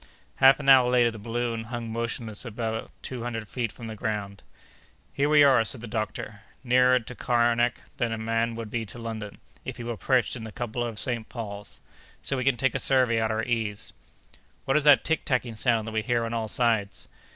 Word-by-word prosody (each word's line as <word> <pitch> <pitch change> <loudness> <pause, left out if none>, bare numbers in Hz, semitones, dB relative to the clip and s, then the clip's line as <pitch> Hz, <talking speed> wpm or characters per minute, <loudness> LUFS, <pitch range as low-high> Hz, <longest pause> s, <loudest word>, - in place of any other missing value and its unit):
Half 135 +1 +7
an 140 - -6
hour 130 -2 +7
later 120 -1 +4
the 110 - -9
balloon 115 +1 -3
hung 115 -1 -5
motionless 115 -2 -4
about 115 -1 -4
two 130 -2 -5
hundred 115 -2 -4
feet 115 0 -3
from 115 - -10
the 110 - -5
ground. 105 -2 -4 0.7
"Here 140 +1 +1
we 150 -1 +7
are!" 130 -5 +5
said 120 +2 -3
the 120 - -7
doctor, 110 -1 -4 0.2
"nearer 125 0 +4
to 125 +1 -9
Kernak 120 -1 +1
than 120 -2 0
a 115 - -2
man 115 +1 -1
would 115 -2 -6
be 115 -1 -1
to 110 +2 -9
London, 110 -3 -6 0.3
if - - -6
he 120 - -6
were 120 -1 -4
perched 130 +1 +1
in 120 - -7
the 110 - -7
cupola 120 +1 -3
of 115 -2 -7
St. 115 -1 -1
Paul's. 105 -4 -7 0.4
So 135 - -1
we 130 - -1
can 135 -1 +2
take 135 +1 +1
a - - -1
survey 125 -4 +2
at 110 - +1
our 110 +1 -1
ease." 115 -3 -3 0.7
"What 135 - +1
is 150 -1 +2
that 145 -1 +7
tick 160 -1 0
tacking 125 -3 -1
sound 115 -1 +1
that - - -4
we 110 0 0
hear 120 0 0
on 115 - -4
all 115 -1 -2
sides?" 110 -4 0
115 Hz, 215 wpm, -26 LUFS, 110-125 Hz, 0.7 s, Half